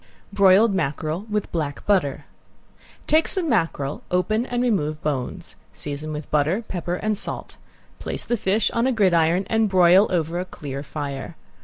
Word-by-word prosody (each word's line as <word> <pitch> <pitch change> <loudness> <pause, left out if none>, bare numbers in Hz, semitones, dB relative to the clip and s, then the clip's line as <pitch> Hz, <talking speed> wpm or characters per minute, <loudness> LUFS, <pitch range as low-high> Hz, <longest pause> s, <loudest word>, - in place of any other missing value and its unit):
~BROILED 200 +2 +5
MACKEREL, 160 +3 -2
WITH 210 -1 -2
BLACK 150 -4 -3
BUTTER~ 180 -10 +1 0.8
Take 315 +1 +3
some 370 -4 -1
mackerel, 165 - 0
open 215 +6 0
and 245 0 -1
remove 155 -11 0
bones. 135 -5 -3 0.2
Season 150 +1 -5
with 150 -1 -6
butter, 155 +9 +1
pepper, 175 -1 -3
and 215 +3 -1
salt. - - -4 0.4
Place - - -5
the 240 - 0
fish 205 0 +1
on 230 +2 +1
a - - +2
gridiron 180 -4 +3
and 220 -1 +2
broil 185 +2 +6
over 170 -1 -1
a 180 - -3
clear 140 -6 -7
fire. 145 +1 -6
180 Hz, 155 wpm, -23 LUFS, 150-210 Hz, 0.8 s, broil